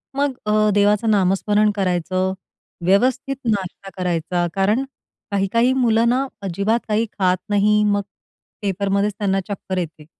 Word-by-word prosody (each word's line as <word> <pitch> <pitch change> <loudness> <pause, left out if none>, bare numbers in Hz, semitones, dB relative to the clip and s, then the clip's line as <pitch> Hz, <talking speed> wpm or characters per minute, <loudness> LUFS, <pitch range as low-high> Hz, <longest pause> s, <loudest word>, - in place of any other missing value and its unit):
मग 280 0 +1
अ, 215 0 +3
देवाचं 205 +2 +3
नामस्मरण 205 +2 +2
करायचं, 185 -1 0 0.5
व्यवस्थित 255 +8 +2
नाश्ता 195 -3 -2
करायचा. 175 -1 -1
कारण 205 +6 +1 0.5
काही-काही 230 +6 +2
मुलं 235 -3 +3
ना, 260 +3 +1 0.2
अजिबात 200 +4 0
काही 220 +1 +1
खात 185 -1 +3
नाही. 210 +1 +3
मग 205 -1 +2 0.6
पेपरमध्येच 200 +1 0
त्यांना 195 -2 0
चक्कर 190 -1 -4
येते. 160 -3 -5
205 Hz, 125 wpm, -21 LUFS, 190-215 Hz, 0.6 s, अ